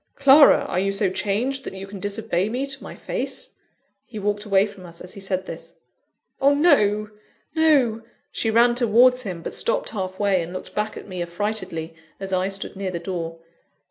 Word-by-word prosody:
Clara! 280 +1 +7
are 180 - -1
you 195 +1 +1
so 195 -1 0
changed, 240 +8 -1
that - - -7
you 190 0 -6
can 195 0 -9
disobey 200 -1 -1
me 250 +4 -2
to 275 -1 -5
my - - -8
face?" - - -4 0.6
He 230 - -9
walked 205 +1 -1
away 195 -1 +4
from 200 -3 -11
us 170 -1 -11
as 180 - -8
he - - -9
said 190 -1 -2
this. - - -8 0.7
"Oh, 280 +1 +5
no! 215 -10 +3 0.4
no!" 280 -9 +3 0.3
She 225 - -1
ran 235 +2 +5
towards 245 +1 +4
him; 180 -7 -6
but - - -5
stopped - - 0
halfway, 190 -1 0
and 170 +2 -6
looked 185 - -7
back 210 +1 -2
at - - -9
me 185 -2 -5
affrightedly, 175 -2 -3 0.3
as 195 -1 -4
I 185 0 +1
stood 195 0 -4
near 195 0 -3
the 180 - -3
door. 170 -2 -5
205 Hz, 190 wpm, -23 LUFS, 185-240 Hz, 0.7 s, Clara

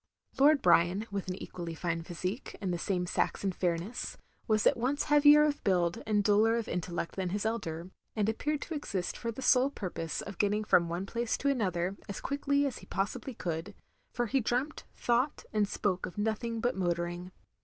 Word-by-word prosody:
Lord 290 +1 +6
Brian, 175 +4 +4
with 200 -2 -3
an 180 - -2
equally 170 -3 -6
fine 170 +1 -2
physique, 180 - -5
and 190 -4 -2
the 175 - -2
same 180 0 0
Saxon 195 +2 0
fairness, 180 +5 -2 0.3
was 215 -2 +2
at - - +5
once 260 +5 0
heavier 295 0 +7
of 295 -1 0
build, 180 +1 +1
and 210 -1 +2
duller 215 +2 +4
of 230 - -3
intellect 175 -1 -3
than 185 -2 -1
his 205 +3 -2
elder; 180 -6 -3 0.2
and 210 -2 +1
appeared 290 +7 -1
to 335 - -6
exist 200 - -3
for 235 - -3
the 260 +4 -7
sole 260 +1 +5
purpose 175 - -4
of 195 -2 -8
getting 210 +1 +2
from 170 -5 +4
one 175 +3 -2
place 235 +2 -1
to 280 - +1
another 190 -7 0
as 200 - -4
quickly 280 0 +1
as 275 - -3
he - - -14
possibly 205 +6 -3
could; 175 +3 -4 0.4
for 240 - -1
he 265 +4 +1
dreamt, 255 +6 -1
thought, 245 +4 +1
and 210 -1 +2
spoke 190 -2 -1
of 180 - -11
nothing 225 +2 -1
but 245 - +1
motoring. 175 0 -2
205 Hz, 190 wpm, -31 LUFS, 180-240 Hz, 0.4 s, heavier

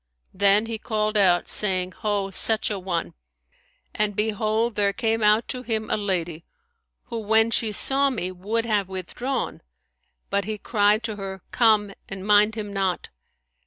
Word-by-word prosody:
Then 200 +2 +4
he 225 -1 -5
called 215 -1 -1
out, 185 -4 +3
saying, 185 -3 +1
Ho, 205 -3 -1
such 220 +3 +2
an 195 -3 -4
one!'; 175 -3 -2 0.8
and 210 -1 0
behold 220 +2 0
there 200 -1 +1
came 225 +3 0
out 210 +2 +3
to 250 - -3
him 220 -3 -3
a - - +3
lady 175 -5 -2 0.7
who, 230 -2 -3
when 220 +1 +3
she 225 -1 0
saw 275 +6 +1
me, 185 -8 -3
would 210 +6 -2
have 205 -4 0
withdrawn; 215 +8 -4 0.7
but 200 -1 0
he 215 0 -3
cried 210 +1 +2
to 220 -2 -4
her, 190 -2 -6
Come, 215 -4 +3 0.2
and 195 -1 -6
mind 210 +1 +4
him 205 -2 -5
not.' 190 -3 -1
210 Hz, 160 wpm, -24 LUFS, 195-220 Hz, 0.8 s, Then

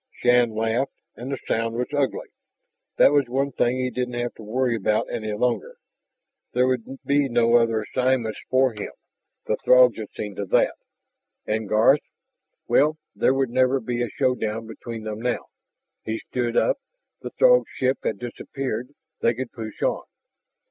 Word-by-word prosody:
Shann 120 -1 +3
laughed, 115 +4 0 0.2
and 125 +3 -6
the 135 - -2
sound 115 0 0
was 125 +1 0
ugly. 140 -2 -1 0.7
That - - +7
was 145 -3 +3
one 135 +3 0
thing 120 0 +1
he 130 0 -1
didn't 125 -1 -3
have 120 0 -2
to - - -13
worry 120 +3 0
about 105 0 +1
any 110 -1 -3
longer. 125 - -1 0.8
There 125 +1 +3
would 130 +1 -3
be 140 -1 +2
no 120 0 +4
other 115 -2 +1
assignments 125 -2 0
for 130 0 +3
him, 105 -2 -7 0.5
the - - 0
Throgs 125 -2 +5
had 110 - -6
seen 105 -2 -5
to 100 - -2
that. - - +3 0.7
And 110 -1 -2
Garth... 115 +7 +5 0.7
well, 155 +2 +3 0.2
there 130 - +3
would 135 -3 0
never 130 +2 +3
be 120 0 -3
a 120 - -1
showdown 115 -2 -1
between 115 0 -8
them 110 0 -5
now. 125 0 -1 0.6
He 110 0 -3
stood 120 -1 -2
up. - - +3 0.4
The - - -5
Throg - - +6
ship 130 0 +1
had 110 - -2
disappeared; 125 +2 -5 0.3
they 115 - +2
could 130 0 -5
push 110 -2 -7
on. - - +1
120 Hz, 165 wpm, -24 LUFS, 115-130 Hz, 0.8 s, That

